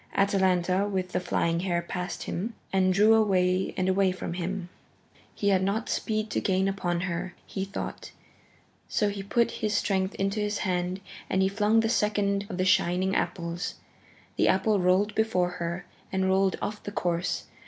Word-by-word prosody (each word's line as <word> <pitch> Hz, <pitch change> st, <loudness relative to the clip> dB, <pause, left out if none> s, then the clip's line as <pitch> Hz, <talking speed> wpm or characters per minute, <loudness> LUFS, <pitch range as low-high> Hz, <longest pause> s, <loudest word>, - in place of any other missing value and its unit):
Atalanta 190 Hz, -1 st, +2 dB
with 185 Hz, -2 st, -2 dB
the -, -, 0 dB
flying 170 Hz, -2 st, 0 dB
hair 175 Hz, -1 st, 0 dB
passed 180 Hz, +1 st, -4 dB
him, 215 Hz, +6 st, -4 dB, 0.2 s
and 185 Hz, -1 st, +3 dB
drew 210 Hz, +4 st, +5 dB
away 190 Hz, -4 st, +2 dB
and 185 Hz, -1 st, +1 dB
away 190 Hz, 0 st, +3 dB
from 185 Hz, -1 st, -5 dB
him. 180 Hz, +1 st, -4 dB, 0.7 s
He 200 Hz, -, +1 dB
had 190 Hz, -2 st, +3 dB
not 200 Hz, +4 st, -1 dB
speed 215 Hz, -1 st, -1 dB
to -, -, 0 dB
gain 190 Hz, 0 st, +1 dB
upon 175 Hz, -3 st, -1 dB
her 180 Hz, 0 st, -3 dB
now, -, -, -30 dB
he 195 Hz, -1 st, -4 dB
thought, 195 Hz, -, -6 dB, 0.8 s
so 210 Hz, -, +1 dB
he 200 Hz, -1 st, -4 dB
put 235 Hz, +4 st, +1 dB
his 210 Hz, -1 st, 0 dB
strength 190 Hz, -2 st, 0 dB
into 195 Hz, +2 st, -1 dB
his 210 Hz, 0 st, -1 dB
hand 180 Hz, 0 st, -1 dB, 0.3 s
and 190 Hz, 0 st, +2 dB
he -, -, +4 dB
flung 210 Hz, +3 st, +3 dB
the 225 Hz, -, +1 dB
second 205 Hz, -3 st, +1 dB
of 180 Hz, -, -5 dB
the 185 Hz, -, +1 dB
shining 185 Hz, +1 st, +2 dB
apples. 170 Hz, -1 st, -2 dB, 0.6 s
The -, -, +3 dB
apple 200 Hz, +2 st, +3 dB
rolled 185 Hz, +3 st, +3 dB
before 205 Hz, -5 st, +1 dB
her 170 Hz, +1 st, -3 dB, 0.3 s
and 190 Hz, 0 st, +1 dB
rolled 190 Hz, 0 st, +3 dB
off 210 Hz, 0 st, -3 dB
the 205 Hz, -, -6 dB
course. 175 Hz, -3 st, -1 dB
190 Hz, 175 wpm, -27 LUFS, 180-205 Hz, 0.8 s, drew